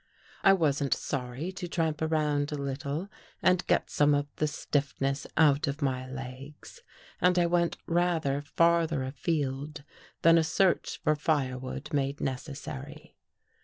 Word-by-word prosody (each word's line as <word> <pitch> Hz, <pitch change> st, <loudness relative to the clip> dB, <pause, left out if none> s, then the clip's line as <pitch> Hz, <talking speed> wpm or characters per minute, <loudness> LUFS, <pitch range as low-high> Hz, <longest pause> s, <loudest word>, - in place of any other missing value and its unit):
I 195 Hz, -, +7 dB
wasn't 145 Hz, -6 st, +2 dB
sorry 135 Hz, +5 st, -4 dB
to 180 Hz, -1 st, -6 dB
tramp 160 Hz, -3 st, -1 dB
around 150 Hz, -2 st, +1 dB
a -, -, -2 dB
little 140 Hz, +4 st, -3 dB, 0.4 s
and 180 Hz, 0 st, +4 dB
get -, -, +1 dB
some 145 Hz, 0 st, +4 dB
of 145 Hz, 0 st, 0 dB
the 155 Hz, -, +1 dB
stiffness 140 Hz, -2 st, -1 dB
out 150 Hz, -1 st, +4 dB
of 140 Hz, +2 st, -3 dB
my 130 Hz, -1 st, -1 dB
legs, 135 Hz, -, -9 dB, 0.4 s
and 180 Hz, 0 st, +4 dB
I 175 Hz, -, +4 dB
went 170 Hz, 0 st, +1 dB
rather 165 Hz, -5 st, +1 dB
farther 165 Hz, -1 st, +2 dB
afield 145 Hz, +1 st, -3 dB, 0.4 s
than 165 Hz, 0 st, +7 dB
a -, -, +2 dB
search 185 Hz, +3 st, +1 dB
for 155 Hz, -, +3 dB
firewood 135 Hz, -2 st, -2 dB
made 140 Hz, 0 st, 0 dB
neces 135 Hz, +1 st, -4 dB
sary. 145 Hz, +1 st, -9 dB
150 Hz, 140 wpm, -29 LUFS, 140-165 Hz, 0.4 s, I